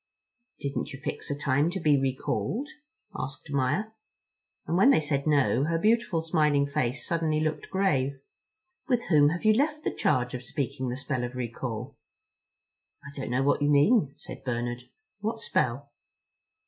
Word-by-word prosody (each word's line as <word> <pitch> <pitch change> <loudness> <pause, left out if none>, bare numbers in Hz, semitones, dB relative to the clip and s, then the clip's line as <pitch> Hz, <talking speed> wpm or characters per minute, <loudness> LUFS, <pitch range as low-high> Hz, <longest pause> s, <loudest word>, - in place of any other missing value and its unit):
"Didn't 140 0 -3
you 140 - -8
fix - - -5
a 145 - -2
time 145 +2 +2
to 190 +2 -3
be 150 -4 +4
recalled?" 135 - -1 0.5
asked 135 -3 -6
Maia. 140 +11 0 0.7
And 165 - -1
when 195 +9 +6
they 275 - +6
said 145 -2 -1
no, 140 -3 +3
her 165 +1 +1
beautiful 210 -4 +2
smiling 150 -4 +2
face 130 -3 -1
suddenly 160 -2 0
looked 155 0 -2
grave. 140 -9 +1 0.7
"With 245 -4 +1
whom 145 -4 +6
have 175 +6 -4
you 215 - +7
left 300 +5 0
the - - -1
charge 125 -1 +1
of 125 - -4
speaking 130 0 -3
the 125 - -3
spell 135 -2 -2
of 120 +1 -4
recall?" 120 0 -5 1.1
"I 140 0 -11
don't 135 - -4
know 125 +2 +1
what 145 - +2
you 145 - +3
mean," 145 - +4
said - - -10
Bernard. 120 -1 -3 0.3
"What 220 +2 -2
spell?" 140 - -1
145 Hz, 160 wpm, -28 LUFS, 130-170 Hz, 1.1 s, you